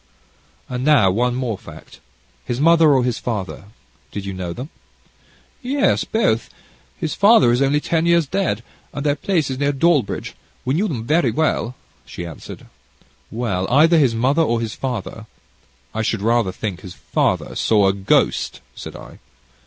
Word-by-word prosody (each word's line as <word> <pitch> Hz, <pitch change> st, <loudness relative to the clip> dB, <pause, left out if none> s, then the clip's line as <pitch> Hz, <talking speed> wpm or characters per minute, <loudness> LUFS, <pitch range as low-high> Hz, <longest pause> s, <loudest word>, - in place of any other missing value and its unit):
"And, 125 Hz, 0 st, -4 dB
now, 135 Hz, -10 st, +5 dB
one 120 Hz, +5 st, 0 dB
more 125 Hz, -6 st, -3 dB
fact. -, -, -13 dB, 0.4 s
His 120 Hz, 0 st, -3 dB
mother 165 Hz, 0 st, +5 dB
or 130 Hz, -3 st, +3 dB
his 125 Hz, -2 st, -1 dB
father, 105 Hz, -6 st, -4 dB, 0.5 s
did 100 Hz, -1 st, -5 dB
you 100 Hz, -, -4 dB
know 90 Hz, -2 st, -5 dB
them?" 125 Hz, -, -7 dB, 0.9 s
"Yes, 275 Hz, +2 st, +1 dB
both; 170 Hz, -, 0 dB, 0.5 s
his 160 Hz, -, -3 dB
father 200 Hz, -, +5 dB
is 120 Hz, +2 st, +1 dB
only 140 Hz, +2 st, +3 dB
ten 165 Hz, +2 st, 0 dB
years 170 Hz, -1 st, +4 dB
dead, 140 Hz, -, -1 dB, 0.3 s
and 145 Hz, -, -4 dB
their 145 Hz, -, +3 dB
place 155 Hz, -3 st, -1 dB
is 130 Hz, -, -4 dB
near 145 Hz, 0 st, +2 dB
Dawlbridge. 145 Hz, -4 st, 0 dB, 0.3 s
We 130 Hz, -, 0 dB
knew 190 Hz, +8 st, +1 dB
them 120 Hz, -, -4 dB
very 160 Hz, +6 st, +2 dB
well," 135 Hz, -6 st, 0 dB, 0.3 s
she 85 Hz, -, -8 dB
answered. 80 Hz, -3 st, -10 dB, 0.6 s
"Well, 110 Hz, -5 st, -2 dB
either 160 Hz, +5 st, +5 dB
his 130 Hz, -6 st, +3 dB
mother 135 Hz, +8 st, +2 dB
or 120 Hz, -7 st, +1 dB
his 115 Hz, -1 st, -3 dB
father 115 Hz, -3 st, -5 dB, 0.7 s
I 110 Hz, -, -2 dB
should 110 Hz, -2 st, -1 dB
rather 115 Hz, -3 st, +2 dB
think 95 Hz, -2 st, -5 dB
his 90 Hz, -3 st, -10 dB
father, -, -, -1 dB
saw 105 Hz, -3 st, +3 dB
a 95 Hz, -, +3 dB
ghost," 95 Hz, -1 st, +1 dB
said -, -, -9 dB
I. -, -, -12 dB
125 Hz, 165 wpm, -20 LUFS, 110-155 Hz, 0.9 s, now